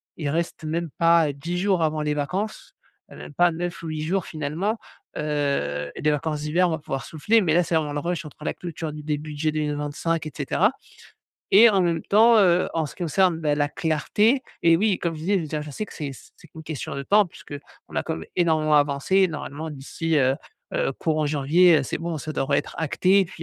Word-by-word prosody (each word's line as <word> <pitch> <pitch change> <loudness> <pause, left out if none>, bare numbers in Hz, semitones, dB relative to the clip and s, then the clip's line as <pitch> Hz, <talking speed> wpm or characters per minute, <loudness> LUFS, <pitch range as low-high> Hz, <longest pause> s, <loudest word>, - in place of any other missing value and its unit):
Il 150 -3 -3
reste 165 +2 -2
même 165 +2 -2
pas, 165 -1 +4
heu, 145 - -2
10 165 +6 -4
jours 185 -2 +1
avant 155 -1 0
les 150 0 0
vacances, 185 +9 -4 0.4
heu, - - -11
même - - -10
pas 175 +3 +4
9 175 +1 -5
ou - - -5
8 155 -1 -3
jours 180 +3 -1
finalement. 160 +8 -2 0.4
Heu, 140 - -1
les 150 - +1
vacances 150 +1 -2
d'hiver, 175 +4 +2
on - - -2
va 160 - -1
pouvoir 135 -3 -4
souffler, 210 +9 +2
mais 165 -5 +1
là, 175 +2 +4
c'est 170 0 -1
vraiment 155 -2 0
le 145 - -2
rush 170 +2 -2
entre 150 -1 -13
la - - -1
clôture 165 -3 -6
d 150 - -7
des 150 0 -1
budgets 155 +1 -3
2025, 150 +2 -2
et 155 - -5
cetera. 175 - +1 0.8
Et 220 +4 +8
en 195 -2 +2
même 170 -2 +1
temps, 225 +3 +5
heu, 180 -3 +4
en 165 -1 +1
ce 145 - -8
qui - - -7
concerne, 175 +1 +2
bah, 150 -2 +1
la 145 0 0
clarté 200 - +1 0.2
et 165 -1 +6
oui, 200 +1 +1
comme 170 -1 -2
je 155 - -8
disais, 195 +6 +1
je - - +1
veux 160 - -4
dire 150 0 -3
je 150 - -8
sais 215 +9 -5
que - - -13
c'est 145 -4 -4 0.3
c'est - - -17
qu'une 160 - -11
question 155 -2 -5
de 140 - -4
temps 205 +8 +4
puisqu'on 145 -5 -12
a - - +1
quand - - -3
même 80 - -8
énormément 160 -3 +2
avancé 145 +4 +2
et 190 -1 +5
normalement 155 0 -6
d'ici, 155 +3 -2
heu 130 -1 +3 0.4
heu, - - 0
courant 155 -1 -1
janvier, 155 +4 +4
heu, - - -1
c'est - - -3
bon 165 0 -4
ça 155 +2 -5
devrait 140 +1 +1
être - - -5
acté 185 +5 +3
puis 175 -1 -13
160 Hz, 235 wpm, -24 LUFS, 150-175 Hz, 0.8 s, Et